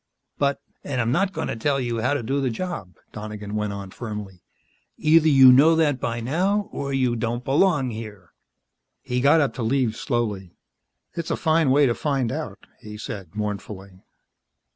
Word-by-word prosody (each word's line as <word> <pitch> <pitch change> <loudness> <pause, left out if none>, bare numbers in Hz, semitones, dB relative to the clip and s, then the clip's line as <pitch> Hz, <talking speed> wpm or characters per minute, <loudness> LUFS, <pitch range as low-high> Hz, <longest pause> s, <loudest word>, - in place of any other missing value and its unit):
"But 140 -1 +1
" - - -46
"And 135 -3 -3
I'm 115 0 +1
not 190 +7 +1
going 160 -4 -4
to - - -3
tell 135 +5 0
you 120 -3 -2
how 130 +5 +1
to 135 - -2
do 135 +5 -1
the 130 - 0
job," 115 - -5 0.2
Donegan 105 -1 -7
went 105 -1 -1
on 100 -1 -7
firmly. 105 -6 -7 0.6
"Either 160 +1 +4
you 135 -3 +8
know 150 +6 +6
that 150 -5 +2
by 115 0 -2
now, 185 - 0
or 140 0 -4
you 130 -3 +1
don't 120 +2 -2
belong 145 -2 +2
here." 105 -6 -9 0.7
He 125 0 -1
got 145 +4 +5
up 140 - 0
to - - -6
leave, 115 -1 +1
slowly. 105 - -3 0.6
"It's 170 -2 -5
a - - 0
fine 160 -3 +2
way 140 +2 +5
to 120 - +2
find 135 -4 -1
out," - - -6
he 105 0 -10
said 100 -5 -8
mournfully. 100 -2 -6
125 Hz, 185 wpm, -23 LUFS, 105-145 Hz, 0.7 s, you